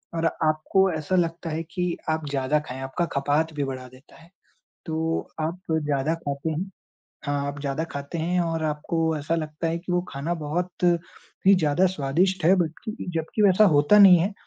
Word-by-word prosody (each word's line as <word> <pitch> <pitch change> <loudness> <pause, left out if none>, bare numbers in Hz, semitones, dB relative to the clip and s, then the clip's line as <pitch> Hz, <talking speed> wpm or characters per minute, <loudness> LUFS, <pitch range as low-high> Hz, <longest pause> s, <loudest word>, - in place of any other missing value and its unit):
और 165 - 0 0.2
आपको 155 +5 +2
ऐसा 160 +3 -2
लगता 165 -1 0
है 160 +1 -3
कि 180 -2 -1
आप 160 -1 -1
ज़्यादा 140 +2 +1
खाएँ, 130 -3 -8
आपका 135 +6 -2
खपात 150 +3 0
भी 145 -1 -2
बढ़ा 130 -1 -5
देता 130 +4 -18
है। 165 - -18 0.6
तो 160 0 -2
आप 165 +4 -2
ज़्यादा 150 -1 0
खाते 140 +2 -2
हैं। 175 +5 -3 0.6
हाँ, 145 0 -1
आप 140 0 -6
ज़्यादा 140 +3 -2
खाते 140 +4 -5
हैं 175 +3 0
और 165 -2 -1
आपको 160 +1 -1
ऐसा 155 +3 -1
लगता 155 0 -3
है 165 +1 -1
कि 180 +1 -5
वो 175 - +2
खाना 145 +6 -3
बहुत 175 +4 -3 0.6
ही 195 - +8
ज़्यादा 165 +1 +2
स्वादिष्ट 180 +2 0
है। 185 +3 +6
बल्कि 180 +6 -3 0.2
जब्कि 165 +7 -1
वैसा 200 +1 +6
होता 145 +9 +5
नहीं 190 -3 +9
है 190 +5 0
160 Hz, 185 wpm, -25 LUFS, 145-175 Hz, 0.6 s, नहीं